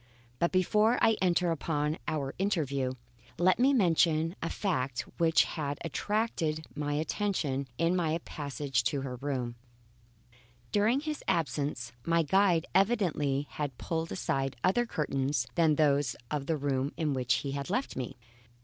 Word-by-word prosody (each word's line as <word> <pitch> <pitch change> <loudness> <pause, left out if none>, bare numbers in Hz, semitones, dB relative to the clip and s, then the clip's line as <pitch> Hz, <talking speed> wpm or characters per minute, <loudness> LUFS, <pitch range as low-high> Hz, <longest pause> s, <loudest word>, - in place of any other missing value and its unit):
But 170 - +2
before 210 +5 +3
I 225 -1 +4
enter 180 -1 +2
upon 150 -1 -1
our 140 -3 -2
interview, 140 -10 0 0.4
let 185 +4 +3
me 265 +3 +5
mention 165 - +3
a 165 - -2
fact 135 - -1 0.2
which 165 -1 +5
had 145 -3 -3
attracted 165 -5 -1
my 145 -1 -2
attention 150 -4 -1
in 170 +2 +2
my 165 -3 +1
passage 140 -2 -2
to 140 - 0
her 130 -2 -5
room. 125 -3 -3 1.1
During 220 +6 +3
his 305 -1 -4
absence 145 -7 -1
my 165 0 +2
guide 180 +1 +3
evidently 175 - +2
had 145 -5 -4
pulled 165 0 -3
aside 135 -6 -1
other 240 +6 +2
curtains 135 - -1
than 160 -3 +3
those 145 -3 +2 0.2
of 145 -2 -2
the 160 - +1
room 140 -1 -1
in 155 -3 0
which 125 -2 +1
he 140 - -2
had 140 +2 -4
left 255 +8 -1
me. 125 -2 -5
155 Hz, 145 wpm, -30 LUFS, 140-180 Hz, 1.1 s, me